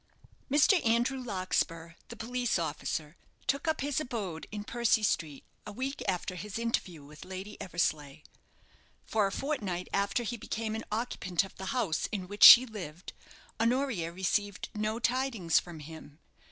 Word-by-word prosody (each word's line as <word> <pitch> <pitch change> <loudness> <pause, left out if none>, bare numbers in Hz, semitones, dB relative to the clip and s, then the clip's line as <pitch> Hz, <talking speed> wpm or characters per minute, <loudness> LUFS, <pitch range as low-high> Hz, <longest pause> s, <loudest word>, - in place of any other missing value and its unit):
Mr. 300 +7 +4
Andrew 240 +3 +1
Larkspur, 185 -6 -2
the 235 - -9
police 245 0 -1
officer, 160 -1 -3 0.3
took 280 +3 -1
up 315 - +1
his 285 +1 0
abode 210 - -4
in 210 -1 -5
Percy 230 -1 +1
Street 155 -8 -1 0.2
a - - -5
week 265 +6 -4
after 185 -1 -1
his 205 +4 -6
interview 195 -9 -2
with 150 +1 -12
Lady 190 +3 -7
Eversleigh. 155 -4 -2 0.8
For 215 -2 +1
a - - -4
fortnight 200 - -3
after 200 +4 +1
he 240 +1 -3
became 220 0 -4
an 220 - -4
occupant 210 -5 -1
of 195 - -11
the 190 - -6
house 200 -9 0
in 190 -4 -3
which 205 +2 -1
she 250 +2 +12
lived, 185 -7 -8 0.5
Honoria 230 -8 +1
received 190 +2 -1
no 215 +1 -1
tidings 240 -8 +1
from 170 -3 -10
him. 150 -1 -11
205 Hz, 155 wpm, -30 LUFS, 175-240 Hz, 0.8 s, she